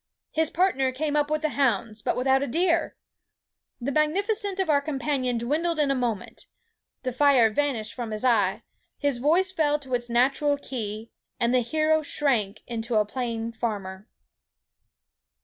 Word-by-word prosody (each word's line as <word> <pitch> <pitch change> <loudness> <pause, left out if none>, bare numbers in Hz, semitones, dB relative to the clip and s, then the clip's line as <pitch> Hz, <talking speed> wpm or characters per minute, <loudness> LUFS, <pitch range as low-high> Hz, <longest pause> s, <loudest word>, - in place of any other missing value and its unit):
His 320 0 +1
partner 320 -8 +1
came 295 +3 -2
up 295 0 +2
with 305 0 -1
the 310 - +2
hounds, 230 -6 0
but 245 - -1
without 265 +1 +3
a 280 - -1
deer! 335 +3 +1 0.8
The 260 +3 -2
magnificence 390 - 0
of 380 - +1
our 290 -2 +3
companion 270 -4 -1
dwindled 310 +8 0
in 290 -2 +2
a - - +3
moment. 240 -5 -3 0.6
The 255 - -1
fire 255 -3 +4
vanished 225 -5 -1
from 235 0 -5
his 215 +3 -3
eye; 235 -4 +2 0.3
his 285 -4 0
voice 340 +8 +3
fell 300 -5 +1
to 265 -3 -8
its 240 0 -1
natural 275 +4 +2
key; 225 -5 -6 0.3
and 235 +1 +2
the 255 - +5
hero 310 +5 +1
shrank 245 -9 0
into 235 0 -3
a 210 -1 +3
plain 230 0 -3
farmer." 205 -3 -4
265 Hz, 160 wpm, -26 LUFS, 235-305 Hz, 0.8 s, the